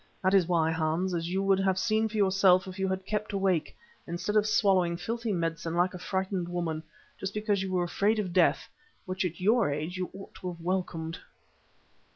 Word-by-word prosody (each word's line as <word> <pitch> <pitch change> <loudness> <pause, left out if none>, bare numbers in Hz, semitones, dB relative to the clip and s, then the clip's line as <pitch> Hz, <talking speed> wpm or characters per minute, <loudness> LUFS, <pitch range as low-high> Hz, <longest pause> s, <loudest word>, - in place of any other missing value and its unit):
That 190 +1 +3
is 190 -4 +5
why, 165 -2 +2
Hans, 165 +3 0
as 170 -1 -2
you 190 +2 0
would 195 -1 +3
have 190 -1 +1
seen 220 +2 +1
for 215 - -5
yourself 190 -2 +4
if 185 0 -8
you 190 - +1
had 190 0 -2
kept 210 0 -3
awake, 190 -5 0 0.3
instead 175 +5 -3
of 210 0 +4
swallowing 185 -5 +3
filthy 230 +5 -3
medicine 165 -2 -2
like 175 +1 +2
a 180 - -7
frightened 190 -1 -2
woman, 170 -3 -2 0.4
just 195 +1 -4
because 210 -2 0
you 190 -1 -3
were 180 -1 +1
afraid 200 +5 +1
of 190 -5 -2
death, 180 -2 +3 0.4
which 185 0 -2
at 175 0 -4
your 215 +1 +3
age 155 +5 -3
you 185 -1 -3
ought 195 - -10
to 180 - -3
have 170 - -14
welcomed." 170 -2 -2
185 Hz, 200 wpm, -29 LUFS, 175-195 Hz, 0.4 s, is